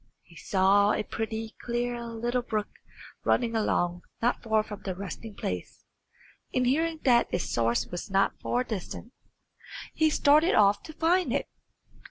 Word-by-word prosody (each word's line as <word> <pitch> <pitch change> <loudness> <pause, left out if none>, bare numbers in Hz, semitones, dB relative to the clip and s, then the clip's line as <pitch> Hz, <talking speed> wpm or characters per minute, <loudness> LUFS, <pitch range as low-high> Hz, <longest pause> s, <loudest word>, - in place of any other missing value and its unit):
He - - -19
saw 200 +1 +3
a 215 - -1
pretty, 220 +1 -4
clear 240 0 -2
little 235 +2 -2
brook 215 -3 -2 0.5
running 235 -2 +1
along 175 -5 0 0.2
not 240 +2 +1
far 220 -2 +2
from 210 -2 -9
their 190 -2 -4
resting 200 +3 -7
place, 90 - -5 0.7
and 255 -1 +1
hearing 320 +5 +1
that 240 -3 +4
its 175 - -1
source 115 0 +1
was 175 +4 -6
not 195 0 +1
far 245 +1 0
distant, 225 +2 -6 0.8
he 315 0 +3
started 305 +4 +4
off 205 -1 +4
to 315 - -9
find 340 +3 +2
it. - - 0
225 Hz, 150 wpm, -28 LUFS, 200-250 Hz, 0.8 s, that